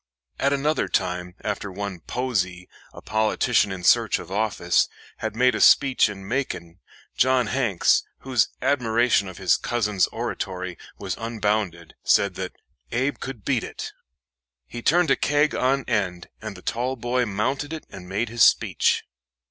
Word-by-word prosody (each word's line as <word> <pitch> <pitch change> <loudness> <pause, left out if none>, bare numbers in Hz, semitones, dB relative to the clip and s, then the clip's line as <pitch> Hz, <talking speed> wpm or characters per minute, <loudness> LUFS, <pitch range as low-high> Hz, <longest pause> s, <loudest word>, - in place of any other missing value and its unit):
At 140 - +2
another 145 +2 +1
time, 90 -1 -2
after 105 -1 -3
one 100 -1 -5
Posey, 90 -5 -2 0.2
a - - -13
politician 110 0 +2
in 95 -2 -6
search - - +4
of - - -10
office, 100 -4 +1 0.3
had - - -4
made 125 +1 +4
a - - -2
speech 135 -5 +5
in 95 -2 -8
Macon, 95 -9 -3 0.4
John 130 -1 +3
Hanks, 115 -6 +2 0.2
whose 130 -4 +2 0.2
admiration 120 -5 +2
of 95 -2 -9
his 95 -3 +3
cousin's 105 -6 +1
oratory 95 -1 -4 0.2
was - - -4
unbounded, 105 -7 -2
said 100 -1 +3
that 95 0 -5 0.4
"Abe 130 +4 0
could 130 -6 -7
beat 130 -5 +1
it." - - -6 0.7
He 120 - -8
turned 165 +3 +3
a - - +6
keg 145 +1 +2
on 135 +2 +1
end, 95 -7 -1
and - - -6
the - - -14
tall 125 +3 -1
boy 125 0 0
mounted 130 +9 -1
it 160 -1 -6
and 90 -2 -10
made 105 +4 -1
his 115 0 +3
speech. - - +3
110 Hz, 155 wpm, -24 LUFS, 95-130 Hz, 0.7 s, a